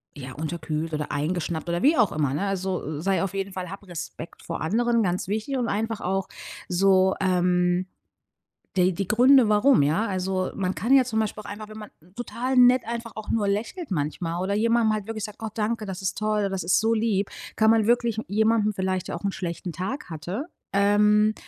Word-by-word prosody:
ja, 130 -2 -8
unterkühlt 160 +1 -4
oder 150 -1 -3
eingeschnappt“ 160 +2 -2
oder 170 0 -1
wie 300 +3 +5
auch 215 -6 +4
immer 145 -3 0
ne? 150 +8 -1
Also: 185 -6 -3
„Sei 195 +2 +1
auf 195 - -3
jeden 195 0 -3
Fall 185 -1 -5
hab 200 +2 -9
Respekt 170 -1 -8
vor 165 - -5
anderen,” 230 +7 +1
ganz 180 -2 -1
wichtig, 220 +7 -2
und 245 -2 -1
einfach 220 +1 -2
auch 195 +1 -1 0.4
so, 190 +1 +3
ähm, 180 -1 +2 0.9
d 185 0 +4
die 185 +2 -3
Gründe, 250 +1 +5
warum, 215 - +5
ja? 160 +11 +1
Also, 185 -1 -1
man 190 -2 -1
kann 225 +12 +1
ja 265 - +6
zum 220 -3 -1
Beispiel 215 0 -2
auch - - -9
einfach 210 +1 -8
wenn 215 - -10
man 210 -1 -9 0.3
total 245 +2 -3
nett 250 0 +7
einfach 235 0 -4
auch 215 - -7
nur 210 -3 +1
lächelt 225 - -3
manchmal 165 +2 -2
oder 195 +2 -1
jemand 230 +1 +2
mal 215 -2 -1
wirklich 220 -2 -4
sagt: 210 0 -11
„Oh, 220 - -2
danke. 215 0 -2
Das 190 0 -6
ist 190 -1 -2
toll. 210 -1 0
Das 190 -2 -3
ist 175 - +3
so 225 +1 +2
lieb. 215 -3 0 0.3
“Kann 220 0 +4
man 225 -2 +3
wirklich 235 -2 +2
jemanden 215 +1 +2
vielleicht, 185 -1 -2
der - - -3
auch 170 - -13
'n 195 - +1
schlechten 170 -1 -5
Tag 195 - -5
hatte, 175 - -5 0.3
ähm, 210 +1 +4
200 Hz, 205 wpm, -25 LUFS, 180-220 Hz, 0.9 s, nett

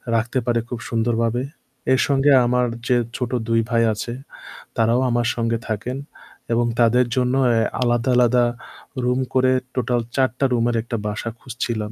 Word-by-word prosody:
রাখতে 115 +3 0
পারে 120 -1 +1
খুব 120 - -4
সুন্দরভাবে। 115 +1 0 0.5
এর 130 - +3
সঙ্গে 140 +1 +3
আমার 125 +1 +2 0.2
যে 125 - +3 0.2
ছোট 125 -2 -3 0.2
২ 115 0 +2
ভাই 115 -1 +2
আছে 110 +3 -5 0.7
তারাও 115 +2 +3
আমার 120 0 +1
সঙ্গে 115 -1 0
থাকেন 115 +4 -3 0.6
এবং 120 +1 +2
তাদের 120 +2 +4
জন্য 125 0 +1
অ্যা 115 -2 +3 0.2
আলাদা 120 0 +1
আলাদা 125 0 +4 0.6
রুম 125 +1 +1
করে 130 0 +3 0.2
টোটাল 125 -1 0
৪ 130 -1 +3
টা 140 - +3
রুমের 120 0 +1
একটা 115 0 -4
বাসা 105 +2 -3
খুঁজছিলাম। 115 -4 -4
120 Hz, 155 wpm, -21 LUFS, 115-125 Hz, 0.7 s, তাদের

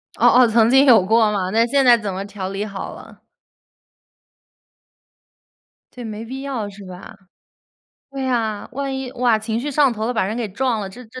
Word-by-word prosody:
哦 - - +3
哦， 250 0 +5
曾 225 0 +3
经 270 +2 +5
有 230 -8 +6
过 220 +1 +3
嘛， 190 -3 -2
那 225 +2 +3
现 275 +2 +2
在 240 -1 +7
怎 210 -3 -5
么 195 +2 -5
调 200 -2 -6
理 195 +2 -4
好 195 -2 -7
了？ - - -15 2.7
对， 250 - -9
没 220 -1 -7
必 260 +3 -7
要 255 -7 -4
是 200 0 -13
吧？ 185 0 -11 1.0
对 275 -1 -5
呀， 225 -5 -2
万 275 0 -4
一， 265 -1 -5
哇， 245 -3 +1
情 220 +1 -3
绪 285 +5 -4
上 280 -2 +3
头 220 0 -4
了， 245 - -1
把 225 - 0
人 210 +4 -3
给 235 -3 -3
撞 235 +3 -1
了， 195 - -5
这 240 +6 -12
这 240 +3 -12
225 Hz, 210 characters per minute, -20 LUFS, 205-255 Hz, 2.7 s, 在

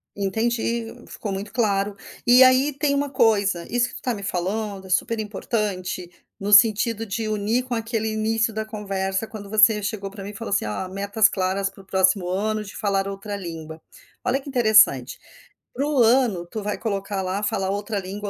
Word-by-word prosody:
Entendi. 230 +3 -1 0.2
Ficou 205 - -6
muito 195 +2 -5
claro. 205 -3 0 0.3
E 245 +2 +8
aí 260 +3 +5
tem 285 +1 0
uma 285 0 0
coisa 200 -8 +2
isso 245 +1 +1
que - - -11
tu - - -8
tá 250 - -1
me 205 - -7
falando 195 +2 -3
é - - -11
super 225 +5 0
importante, 200 -4 -3 0.3
no 200 +1 -3
sentido 220 +1 +5
de 220 +2 -3
unir 215 +3 0
com 250 -1 -5
aquele 225 -1 -2
início 220 +1 0
da 220 0 -3
conversa 195 -2 -3
quando 215 -2 -9
você 215 0 +5
chegou 200 -1 -4
pra 200 -1 -9
mim 200 - -6
e - - -14
falou 225 -1 -4
assim: 195 - +1
"Ó, 105 - -3
metas 200 +2 +2
claras 190 0 -1
para 195 - -15
o - - -21
próximo 190 -1 +2
ano 215 +3 -1
de 200 - -11
falar 195 -2 0
outra 200 +1 -5
língua". 165 -4 -7 0.4
Olha 260 +2 +1
que 280 - -15
interessante. 220 -5 +4 0.5
Para 275 +4 -1
o 300 -1 -1
ano, 225 -7 +3
tu 215 +5 -5
vai 210 0 -2
colocar 200 -2 -3
lá: 190 +2 -2
falar 195 -2 -1
outra 205 +1 -2
língua 200 +2 -6
210 Hz, 195 wpm, -23 LUFS, 195-225 Hz, 0.5 s, E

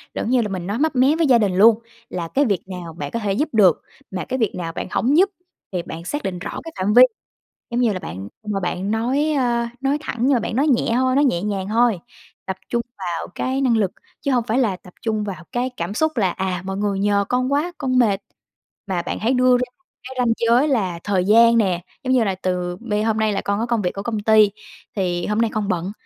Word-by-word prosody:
giống - - -2
như 250 -1 +3
là 220 - -1
mình 185 -2 -4
nói 205 +4 -2
mấp 315 -1 +1
mé 265 +4 +4
với 325 -1 +2
gia 250 -3 +6
đình 205 -5 +1
luôn 220 +3 +6 0.3
là 175 -2 -4
cái 275 - +1
việc 200 -7 0
nào 180 -3 -7
bạn 145 -3 -6
có 230 - -2
thể 205 -3 -1
giúp 295 +10 0
được, 195 -7 +4 0.3
mà 185 -2 -4
cái 260 0 -3
việc 220 -5 0
nào 165 -2 -4
bạn - - -5
hổng 275 +6 +2
giúp 385 +3 +5 0.4
thì 180 - -1
bạn 165 -2 -8
xác 290 +8 -3
định 180 -2 -3
rõ - - -5
cái 330 - -8
phạm 195 +3 +1
vi. 245 +2 +9 0.7
Giống 240 +1 0
như 235 -3 +3
là 185 - -3
bạn 95 - -7
ưm, 210 -1 -4
mà 195 - -1
bạn 180 +2 -2
nói, 260 +8 +1
a, 235 -2 0
nói 275 +2 +1
thẳng 295 - -5
nhưng 260 +4 +3
mà 240 - +2
bạn 220 - -3
nói 285 +4 +2
nhẹ 255 -5 +2
thôi, 255 +1 +2
nói 285 - +4
nhẹ 175 -11 +1
nhàng 200 -2 -2
thôi, 230 -2 +3 0.5
tập 190 - -3
trung 235 0 0 0.2
vào 175 -3 -3
cái 260 +1 -1
năng 250 -4 +3
lực 205 -4 +1 0.3
chứ 280 - 0
hông 245 -2 +2
phải 225 +3 +1
là 220 -8 +1
tập 180 0 -17
trung 215 -2 -1
vào 185 -5 -6
cái 250 +1 -1
cảm 170 +4 -3
xúc, 315 +5 0
là 195 -6 +2
"À, 185 -1 -3
mọi 190 0 -4
người 200 -1 -1
nhờ 200 0 +2
con 255 +2 0
quá, 305 +5 0
con 255 -1 0
mệt." 205 -5 +3 0.7
Mà 185 -3 -1
bạn - - -4
hãy 230 +4 +1
đưa 250 -1 +4
ra 250 - 0
một 360 - -42 0.2
cái 260 +1 -9
ranh 245 -2 +2
giới 240 +5 +4
là 195 - 0
thời 190 -3 +1
gian 230 +3 +6
nè, 185 -6 +1 0.2
giống 260 0 +1
như 250 -3 +4
là 195 -3 0
từ 180 -1 -2
bây 215 -3 -1
"Hôm 220 -1 +1
nay 220 -1 +1
là 195 - -1
con 200 +1 -1
có 230 - 0
công 235 -2 0
việc 180 -2 0
của 200 - -5
công 220 -1 -2
ty, 215 -1 +5 0.4
thì 175 -3 -1
hôm 210 - -1
nay 230 -2 +1
con 215 -2 -1
bận 180 +1 -1
215 Hz, 265 wpm, -21 LUFS, 190-250 Hz, 0.7 s, vi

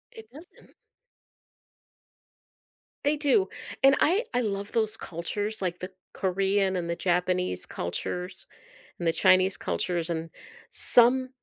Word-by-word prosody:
It 450 -1 -12
doesn't. 320 +6 -16 2.3
They 290 +1 +2
do, 315 +7 +2 0.3
and 270 0 +6
I 385 +9 +3
I 245 - +1
love 200 -3 -3
those 220 -1 0
cultures, 205 +3 -4
like 180 -1 -3
the 185 +1 -7 0.2
Korean 195 0 0
and 170 -1 -4
the 170 - -1
Japanese 180 - -1
cultures 180 - -5 0.5
and 170 - -2
the 165 - +2
Chinese 185 +2 +4
cultures 175 -2 -2
and 165 0 -3 0.4
some, 255 +2 +5
190 Hz, 120 wpm, -27 LUFS, 180-245 Hz, 2.3 s, and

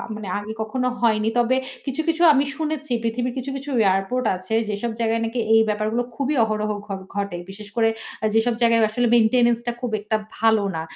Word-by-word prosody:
মানে 210 -2 -7
আগে 205 +1 -5
কখনো 250 +4 -1
হয়নি। 220 -2 +2
তবে 240 +2 +3 0.3
কিছু, 275 +3 -2
কিছু 330 +1 0
আমি 275 0 +3
শুনেছি 305 -3 -3
পৃথিবীর 240 +2 -1
কিছু, 260 +2 -4
কিছু 275 +2 -8 0.2
এয়ারপোর্ট 195 +7 +1
আছে। 185 +4 -6 0.2
যেসব 210 +3 -2
জায়গায় 230 0 +1
নাকি 230 +2 -3
এই 225 - +7
ব্যাপারগুলো 215 +3 0
খুবই 280 +3 -1
অহরহ 215 -1 -1 0.2
ঘ - - -28 0.3
ঘটে। 200 -3 -2
বিশেষ 205 +1 -9
করে 225 -1 +3 0.3
আ - - +2
যেসব 225 +2 +3
জায়গায় 230 -1 +4
আসলে 240 +3 0
মেইনটেন্যান্স 235 +1 +4
টা - - +2
খুব 245 -3 -2
একটা 215 +1 -1 0.2
ভালো 220 -2 +3
না। 160 - -2
230 Hz, 190 wpm, -22 LUFS, 215-250 Hz, 0.3 s, এই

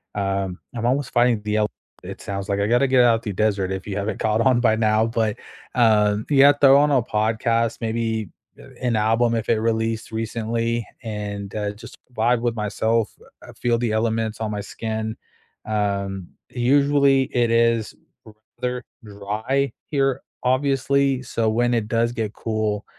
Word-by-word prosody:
Um, 95 -2 -2 0.2
I'm 115 -1 -3
almost 130 +2 0
finding 120 -2 +3
the 105 0 -1
el 105 -1 +2 0.3
it - - -8
sounds 100 -1 -5
like, 100 0 0
I 100 - +1
gotta 120 +4 +3
get 130 -1 +4
out 115 -1 +3
the 105 - -3
desert 100 -2 0
if 95 +1 -5
you 100 - -4
haven't 100 +2 -3
caught 110 0 +1
on 125 0 +3
by 110 -3 +3
now, 110 0 +2
but, 115 -2 -1 0.4
um, 105 -3 +3
yeah, 140 0 +7
throw 140 -1 +6
on 145 +1 +3
a 130 -3 +4
podcast, 115 +1 0
maybe, 115 -1 -2 0.3
uh, - - -13 0.2
an 120 -2 0
album 115 +2 +2
if 115 -1 -3
it 115 - +3
released 115 0 -1
recently 115 +1 -2 0.2
and, 105 -2 -5
uh, 105 -1 -2
just 105 +2 -12 0.2
vibe 120 +1 +1
with 120 -1 -1
myself, 110 +1 -1 0.2
uh, - - -13
feel 120 -1 0
the 115 -2 -1
elements 110 0 -1
on 110 -1 -2
my 105 - -3
skin, 110 +1 -4 0.5
um, 100 -3 -2 0.2
usually 140 +2 +3
it 120 -1 +3
is 115 -1 +2 0.7
rather 125 0 -2 0.2
dry 110 +7 -2 0.2
here, 135 -3 +1 0.2
obviously, 135 +1 +1
so 115 -3 -1
when 120 +2 +1
it 115 -3 0
does 115 +1 +1
get 110 -3 -3
cool, 110 -2 -2
115 Hz, 165 wpm, -22 LUFS, 105-120 Hz, 0.7 s, yeah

